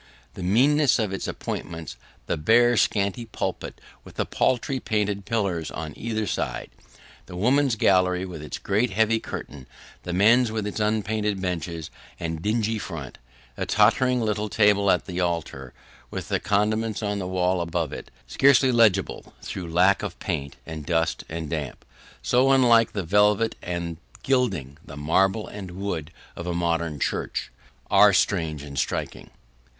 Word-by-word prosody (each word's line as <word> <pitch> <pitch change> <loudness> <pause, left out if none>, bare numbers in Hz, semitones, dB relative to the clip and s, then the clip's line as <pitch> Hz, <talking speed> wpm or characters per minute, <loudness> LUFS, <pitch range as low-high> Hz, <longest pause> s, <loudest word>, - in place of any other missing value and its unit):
The - - -9
meanness 135 +9 +4
of 105 -4 -1
its 95 - -3
appointments 80 -2 -5 0.3
the - - -1
bare 115 +10 +4
and 120 - +2
scanty 100 +3 0
pulpit, - - -4 0.2
with - - -14
the - - -1
paltry 130 +2 0
painted 105 -3 -1
pillars 100 -7 -1
on 75 -1 -6
either 110 -1 -2
side - - -3 0.6
the - - -9
women's 130 +6 +2
gallery 90 -2 +2
with 90 -5 -8
its 75 - -6
great 110 +5 0
heavy 110 +2 +2
curtain 70 -10 -8 0.3
the 90 - -5
men's 110 +6 +4
with 110 -2 -2
its 105 - -4
unpainted 105 -1 0
benches 85 -3 -4 0.3
and 80 -1 -4
dingy 110 +2 0
front - - -7 0.4
the - - -4
tottering 120 +4 +3
little 105 -1 -1
table 100 0 +3
at 90 - +2
the 90 -1 -4
altar, 85 -7 -2 0.4
with - - -6
the - - +1
commandments 110 +2 0
on 105 -1 -1
the 90 - -4
wall 90 0 +1
above 85 -1 -2
it, - - -8 0.2
scarcely 135 -1 +4
legible 110 -5 +2
through 85 -3 -6
lack 90 +4 +4
of 100 -4 -5
paint, 70 -7 -4
and 80 -2 -7
dust 80 -1 0
and 80 0 -4
damp 75 -5 -4 0.4
so 125 - +3
unlike 120 -4 +5
the 100 - -2
velvet 105 +5 +3
and 85 -2 -4 0.3
gilding, 100 - 0
the 70 - -11
marble 95 +8 +1
and 100 -3 -8
wood, 90 -4 -4 0.3
of 85 - -7
a 85 - -2
modern 85 -3 -1
church - - -2 0.4
are - - +7
strange 75 -3 0
and 70 -2 -5
striking. - - -3
100 Hz, 155 wpm, -25 LUFS, 85-110 Hz, 0.6 s, are